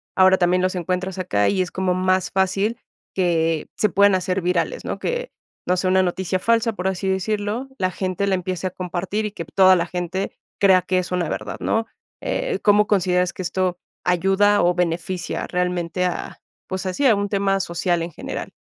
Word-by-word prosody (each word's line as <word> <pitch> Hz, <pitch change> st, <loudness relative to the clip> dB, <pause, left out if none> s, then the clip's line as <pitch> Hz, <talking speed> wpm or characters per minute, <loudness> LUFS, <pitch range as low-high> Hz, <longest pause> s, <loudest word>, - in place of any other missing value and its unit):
ahora 190 Hz, 0 st, +6 dB
también 180 Hz, 0 st, +2 dB
los 185 Hz, 0 st, 0 dB
encuentras 185 Hz, +1 st, -2 dB
acá 105 Hz, -, +1 dB
y 190 Hz, -2 st, +1 dB
es 180 Hz, -, -8 dB
como 185 Hz, -1 st, 0 dB
más 185 Hz, 0 st, +1 dB
fácil 195 Hz, +4 st, 0 dB, 0.4 s
que 165 Hz, -4 st, +1 dB
se 210 Hz, -, +2 dB
puedan 200 Hz, +2 st, +4 dB
hacer 185 Hz, +1 st, -1 dB
virales, 180 Hz, -, -1 dB
¿no?, -, -, -3 dB
que 485 Hz, +1 st, -3 dB, 0.4 s
no 180 Hz, -, +2 dB
sé, 185 Hz, +1 st, 0 dB
una 190 Hz, 0 st, +4 dB
noticia 185 Hz, +1 st, -1 dB
falsa, 230 Hz, +2 st, +2 dB
por 190 Hz, -1 st, -3 dB
así 190 Hz, 0 st, -2 dB
decirlo, 210 Hz, +5 st, -1 dB
la 185 Hz, -1 st, 0 dB
gente 185 Hz, +1 st, -2 dB
la 195 Hz, -, +1 dB
empiece 185 Hz, 0 st, -3 dB
a 185 Hz, -, -5 dB
compartir 185 Hz, +4 st, -3 dB
y 210 Hz, -, -3 dB
que 170 Hz, -, -6 dB
toda 185 Hz, +4 st, +5 dB
la 170 Hz, -, +1 dB
gente 180 Hz, +2 st, -3 dB, 0.3 s
crea 190 Hz, -2 st, +5 dB
que 185 Hz, +1 st, 0 dB
es 180 Hz, -, -4 dB
una 180 Hz, -2 st, 0 dB
verdad, -, -, -4 dB
¿no?, 225 Hz, 0 st, 0 dB, 0.4 s
eh, 475 Hz, -5 st, -2 dB
¿cómo 210 Hz, 0 st, +5 dB
consideras 180 Hz, -3 st, +2 dB
que -, -, -6 dB
esto 180 Hz, 0 st, -1 dB, 0.3 s
ayuda 195 Hz, +3 st, +3 dB
o 175 Hz, +1 st, +4 dB
beneficia 175 Hz, +1 st, -2 dB
realmente 180 Hz, 0 st, -1 dB
a 180 Hz, -, -4 dB, 0.3 s
pues 185 Hz, 0 st, -4 dB
así, 185 Hz, +10 st, -1 dB
a 225 Hz, -, +5 dB
un 205 Hz, 0 st, -2 dB
tema 195 Hz, -1 st, +1 dB
social 175 Hz, -1 st, -1 dB
en 170 Hz, -, -5 dB
general? -, -, -6 dB
185 Hz, 195 wpm, -22 LUFS, 180-195 Hz, 0.4 s, ahora